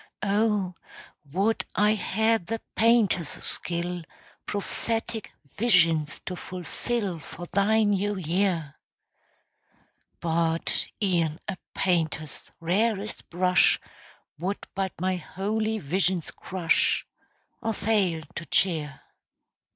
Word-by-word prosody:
Oh, 205 -2 +2 0.6
would 200 +7 +1
I 210 +2 +4
had 220 -1 +1
the 225 +1 -2 0.2
painter's 220 -8 +4
skill 175 +1 -1 0.5
Prophetic 225 +2 -3 0.2
visions 165 -9 +3
to 180 - -3
fulfill 185 - -3
For 165 +4 -8
thy 210 +4 +3
new 205 0 +1
year; 175 -3 0 1.4
But 165 0 0 0.2
e'en 170 -5 +1
a 195 - -2 0.2
painter's 160 -5 -1
rarest 205 +4 0
brush 180 +1 +4 0.6
Would 190 +4 -2
but 190 -1 -1
my 185 +1 +1
holy 215 +6 -1
visions 180 0 +1
crush, 180 -3 +1 0.6
Or 225 -1 0
fail 195 -7 +1
to 170 - -5
cheer. 155 -7 +1
185 Hz, 95 wpm, -27 LUFS, 170-210 Hz, 1.4 s, I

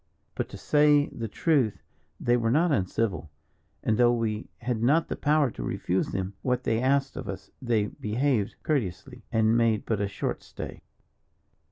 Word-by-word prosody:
"But - - -3
to - - -8
say 150 -1 +4
the 115 - -5
truth, 130 - +1 0.4
they 120 - +2
were 115 -2 +1
not 160 +7 +3
uncivil, 95 - 0 0.5
and 110 - +1
though 120 -1 +6
we 115 -2 -2
had 120 -2 -1
not 150 +8 +3
the - - -2
power 150 -3 +2
to - - -8
refuse 90 +9 -1
them 95 0 -3
what 125 +1 0
they 115 +1 +1
asked 135 +1 +1
of - - -6
us, - - -7
they 115 -5 +1
behaved 110 +1 -1
courteously, 125 - -2
and 110 0 +3
made 115 -2 +2
but 110 -3 0
a 100 - +1
short 100 - -3
stay." - - -8
115 Hz, 170 wpm, -27 LUFS, 105-135 Hz, 0.5 s, though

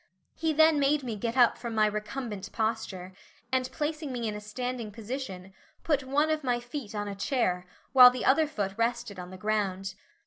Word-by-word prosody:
He 320 0 0
then 315 0 +5
made 285 +1 +2
me 235 -4 -3
get 230 +4 -3
up 240 -2 +5
from 235 -2 -5
my 215 -1 +4
recumbent 210 -1 -4
posture, 220 -5 -3 0.4
and 255 -1 +1
placing 305 -1 -3
me 240 -2 -2
in 215 - -2
a 210 - -6
standing 240 +2 -4
position, 205 -4 -6 0.3
put 290 -4 +1
one 290 +4 +1
of 310 -1 -1
my 245 -2 +1
feet 240 -2 -7
on 205 0 -2
a 200 - -4
chair, 195 -5 0 0.3
while 250 -2 +11
the 250 0 -4
other 310 +4 +4
foot 205 -10 -3
rested 230 -3 -1
on 180 0 -7
the 185 - -9
ground. 195 -2 -1
235 Hz, 195 wpm, -29 LUFS, 205-270 Hz, 0.4 s, while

